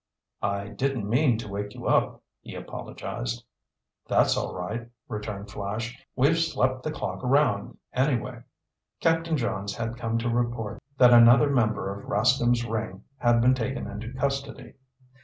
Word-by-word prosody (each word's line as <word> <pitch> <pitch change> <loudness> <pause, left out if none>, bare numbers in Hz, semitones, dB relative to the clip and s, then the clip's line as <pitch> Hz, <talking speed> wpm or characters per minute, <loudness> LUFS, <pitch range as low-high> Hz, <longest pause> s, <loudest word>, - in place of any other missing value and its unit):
"I 100 0 -2
didn't 120 +1 -2
mean 120 +1 +3
to 115 - -6
wake 105 +1 -5
you - - -8
up," - - +2 0.2
he - - -9
apologized. - - -5 0.6
"That's - - +3
all - - -3
right," 115 +6 -4 0.2
returned 105 -2 -5
Flash. 110 +4 -4 0.2
"We've 145 +6 +3
slept 130 -6 +1
the 155 - -3
clock 150 -3 -4
around 125 -6 +2 0.2
anyway." 125 -3 0 0.6
Captain 165 -1 +2
Johns 100 -5 -2
had 115 0 -4
come 115 -1 -1
to 115 +1 -1
report 120 -3 -1 0.2
that 125 -1 +7
another 120 +4 +7
member 110 -6 +1
of 100 - -10
Rascomb's 120 +2 +3
ring 110 -4 -4 0.2
had 120 -1 +4
been 125 +2 +5
taken 130 +2 -2
into 110 +4 -6
custody. 135 +1 -3
120 Hz, 145 wpm, -26 LUFS, 105-130 Hz, 0.6 s, that